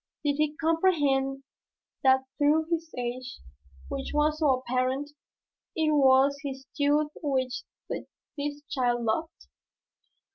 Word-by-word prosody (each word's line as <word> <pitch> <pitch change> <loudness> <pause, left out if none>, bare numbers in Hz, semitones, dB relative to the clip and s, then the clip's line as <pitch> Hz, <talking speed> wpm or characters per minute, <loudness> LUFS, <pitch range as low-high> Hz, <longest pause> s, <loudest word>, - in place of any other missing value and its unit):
Did 285 -1 +2
he 305 0 +1
comprehend 290 -5 +1 0.6
that 265 0 +5 0.2
through 300 +2 +4
his 325 -1 -1
age 250 +1 -4 0.5
which 270 -1 -5
was 300 +1 +2
so 305 -3 +3
apparent, 255 +3 -1 0.6
it 315 -1 +2
was 275 -1 +5
his 270 -1 -5
youth 295 +1 +2
which 260 -4 -1 0.7
this 290 0 -4
child 245 -3 +1
loved? 315 +10 -2
285 Hz, 110 wpm, -28 LUFS, 260-300 Hz, 0.7 s, that